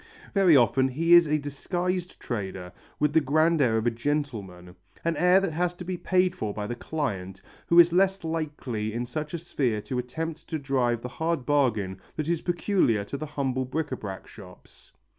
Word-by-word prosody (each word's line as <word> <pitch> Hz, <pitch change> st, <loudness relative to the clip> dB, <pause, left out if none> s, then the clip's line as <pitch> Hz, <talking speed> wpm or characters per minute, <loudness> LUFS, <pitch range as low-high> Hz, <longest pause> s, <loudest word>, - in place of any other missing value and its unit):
Very 185 Hz, -7 st, +6 dB
often 130 Hz, +2 st, +3 dB
he 165 Hz, +6 st, +2 dB
is 170 Hz, -2 st, +8 dB
a 150 Hz, +1 st, +2 dB
disguised 175 Hz, +5 st, -3 dB
trader 95 Hz, -6 st, -5 dB, 0.3 s
with 150 Hz, 0 st, +2 dB
the 160 Hz, -, +5 dB
grand 155 Hz, +3 st, +2 dB
air 115 Hz, -4 st, +3 dB
of 110 Hz, -, -1 dB
a 120 Hz, -, +3 dB
gentleman 115 Hz, -9 st, -3 dB, 0.3 s
an 170 Hz, 0 st, +1 dB
air 180 Hz, +1 st, +5 dB
that 195 Hz, -3 st, -1 dB
has 175 Hz, +2 st, 0 dB
to 180 Hz, -, -8 dB
be 185 Hz, +1 st, -3 dB
paid 185 Hz, +1 st, +1 dB
for 105 Hz, -2 st, -4 dB
by 105 Hz, -, -3 dB
the 120 Hz, -, -3 dB
client, 100 Hz, -9 st, -4 dB, 0.3 s
who 170 Hz, -, +6 dB
is 170 Hz, 0 st, +7 dB
less 190 Hz, +1 st, +2 dB
likely 145 Hz, -9 st, -3 dB
in 120 Hz, +1 st, -2 dB
such 150 Hz, +6 st, -4 dB
a -, -, -1 dB
sphere 135 Hz, -9 st, -1 dB
to 125 Hz, +3 st, -3 dB
attempt 160 Hz, +6 st, -5 dB
to 160 Hz, -, -1 dB
drive 130 Hz, -5 st, 0 dB
the -, -, -3 dB
hard 160 Hz, +1 st, -2 dB
bargain 110 Hz, -10 st, +1 dB
that 155 Hz, 0 st, -3 dB
is 170 Hz, -1 st, 0 dB
peculiar 175 Hz, -, +1 dB
to 100 Hz, -, -6 dB
the 155 Hz, +2 st, -5 dB
humble 130 Hz, -3 st, -1 dB
bric 150 Hz, +4 st, -3 dB
à 130 Hz, -, -3 dB
brac 95 Hz, -2 st, -7 dB
shops. 95 Hz, -6 st, -15 dB
145 Hz, 200 wpm, -27 LUFS, 115-165 Hz, 0.3 s, is